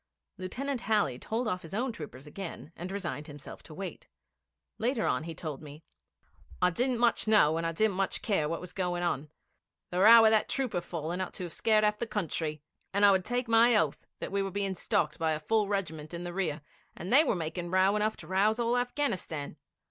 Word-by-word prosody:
Lieutenant 250 Hz, +8 st, -3 dB
Halley 205 Hz, -, +1 dB
told 230 Hz, +2 st, -2 dB
off 185 Hz, -4 st, -2 dB
his 165 Hz, +3 st, -8 dB
own 250 Hz, +4 st, 0 dB
troopers 145 Hz, -, -9 dB
again 170 Hz, 0 st, -8 dB
and 180 Hz, +2 st, -6 dB
resigned 175 Hz, -6 st, -4 dB
himself 145 Hz, -1 st, -10 dB
to 155 Hz, -, -13 dB
wait. 195 Hz, +2 st, -7 dB, 0.7 s
Later 235 Hz, 0 st, 0 dB
on 155 Hz, -, 0 dB
he 165 Hz, -1 st, -6 dB
told 150 Hz, -4 st, -6 dB
me: 150 Hz, +1 st, -11 dB, 0.8 s
'I 180 Hz, -, +3 dB
didn't 245 Hz, +6 st, 0 dB
much 235 Hz, -1 st, +2 dB
know, 185 Hz, -8 st, +5 dB
and 165 Hz, 0 st, -1 dB
I -, -, -1 dB
didn't 200 Hz, +3 st, +1 dB
much 195 Hz, 0 st, -1 dB
care 175 Hz, -9 st, +1 dB
what 165 Hz, -, -3 dB
was 180 Hz, 0 st, -9 dB
going 180 Hz, -2 st, -1 dB
on. 155 Hz, -3 st, -1 dB, 0.6 s
The 180 Hz, -, -1 dB
row 225 Hz, +3 st, +9 dB
of 220 Hz, -, +6 dB
that 220 Hz, -1 st, +2 dB
trooper 255 Hz, -10 st, -1 dB
falling 170 Hz, +1 st, -4 dB
ought 185 Hz, -, -4 dB
to -, -, -6 dB
have 170 Hz, -2 st, -6 dB
scared 215 Hz, -1 st, +3 dB
half 210 Hz, 0 st, +2 dB
the 235 Hz, -, -2 dB
country, 160 Hz, -7 st, -3 dB, 0.3 s
and 200 Hz, +1 st, +4 dB
I 200 Hz, -, +8 dB
would 190 Hz, -1 st, +2 dB
take 245 Hz, +3 st, -2 dB
my 230 Hz, +1 st, +5 dB
oath 160 Hz, -7 st, 0 dB
that -, -, -6 dB
we 200 Hz, 0 st, +1 dB
were 195 Hz, -, -2 dB
being 195 Hz, 0 st, -1 dB
stalked 155 Hz, -3 st, -1 dB
by 160 Hz, -1 st, +1 dB
a 155 Hz, -, -2 dB
full 210 Hz, +6 st, +1 dB
regiment 165 Hz, -6 st, -3 dB
in 170 Hz, -, -5 dB
the 175 Hz, 0 st, -5 dB
rear, 175 Hz, -6 st, -2 dB, 0.3 s
and 185 Hz, +7 st, -3 dB
they 295 Hz, +4 st, +8 dB
were 265 Hz, -, +1 dB
making 170 Hz, +1 st, -4 dB
row 185 Hz, +2 st, +3 dB
enough 215 Hz, +1 st, 0 dB
to -, -, -11 dB
rouse 205 Hz, +5 st, +2 dB
all 235 Hz, +1 st, +1 dB
Afghanistan. 235 Hz, -, -2 dB
190 Hz, 215 wpm, -30 LUFS, 165-220 Hz, 0.8 s, row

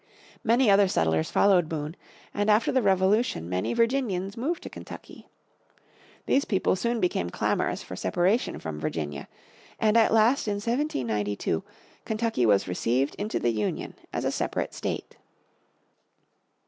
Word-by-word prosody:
Many 235 Hz, +2 st, +3 dB
other 200 Hz, 0 st, +5 dB
settlers 80 Hz, -, +1 dB
followed 180 Hz, -5 st, +3 dB
Boone, 155 Hz, 0 st, -4 dB, 0.4 s
and 205 Hz, +1 st, 0 dB
after 215 Hz, +2 st, +4 dB
the 260 Hz, -, +2 dB
Revolution 190 Hz, -, +2 dB
many 90 Hz, +1 st, -1 dB
Virginians 230 Hz, -6 st, 0 dB
moved 295 Hz, +9 st, -2 dB
to -, -, -7 dB
Kentucky. -, -, -11 dB, 1.0 s
These 275 Hz, -, +2 dB
people 190 Hz, -2 st, +1 dB
soon 235 Hz, +5 st, -1 dB
became 135 Hz, -, 0 dB
clamorous -, -, -1 dB
for -, -, -8 dB
separation 190 Hz, +8 st, 0 dB
from 80 Hz, -2 st, -6 dB
Virginia, 75 Hz, -2 st, -4 dB, 0.5 s
and 215 Hz, 0 st, +3 dB
at 225 Hz, -1 st, +5 dB
last 225 Hz, +4 st, +3 dB
in 205 Hz, -, 0 dB
1792 125 Hz, -, -1 dB, 0.4 s
Kentucky 220 Hz, -, 0 dB
was 100 Hz, -2 st, +3 dB
received 120 Hz, +10 st, 0 dB
into 210 Hz, +2 st, -2 dB
the 120 Hz, -, +1 dB
Union 105 Hz, -2 st, -3 dB, 0.2 s
as -, -, -3 dB
a -, -, +1 dB
separate -, -, -2 dB
state. -, -, -5 dB
190 Hz, 135 wpm, -27 LUFS, -, 1.0 s, other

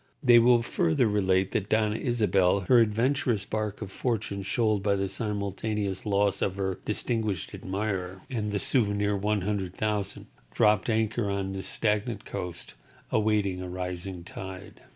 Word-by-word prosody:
They 120 Hz, -3 st, +8 dB
will 120 Hz, 0 st, +5 dB
relate -, -, -8 dB
further 160 Hz, -7 st, +2 dB, 0.5 s
that 100 Hz, 0 st, -11 dB
Doña 110 Hz, 0 st, +2 dB
Isabel, 100 Hz, -6 st, +2 dB
her 120 Hz, +6 st, +5 dB
adventurous 115 Hz, 0 st, +1 dB
bark 110 Hz, -1 st, -3 dB
of 95 Hz, -, -8 dB
fortune 105 Hz, -5 st, -2 dB
shoaled 110 Hz, +1 st, +1 dB
by 100 Hz, 0 st, +2 dB
the 95 Hz, 0 st, -1 dB
simultaneous 105 Hz, -1 st, -3 dB
loss 100 Hz, -1 st, +2 dB
of 95 Hz, -, 0 dB
her 95 Hz, -2 st, -2 dB
distinguished 105 Hz, -4 st, -1 dB
admirer 95 Hz, -1 st, -3 dB
and 110 Hz, -6 st, -2 dB
the 100 Hz, -, 0 dB
souvenir 105 Hz, -5 st, +1 dB
hundred 100 Hz, -2 st, -1 dB
thousand, 105 Hz, -2 st, -2 dB, 0.3 s
dropped 105 Hz, 0 st, +3 dB
anchor 110 Hz, -1 st, +1 dB
on 100 Hz, -1 st, -2 dB
this 95 Hz, 0 st, -5 dB
stagnant 105 Hz, 0 st, -1 dB
coast, 90 Hz, -1 st, -6 dB, 0.4 s
awaiting 105 Hz, -4 st, +1 dB
a 90 Hz, -, -5 dB
rising 90 Hz, 0 st, -5 dB
tide. 95 Hz, +1 st, -9 dB
105 Hz, 145 wpm, -28 LUFS, 95-110 Hz, 0.5 s, They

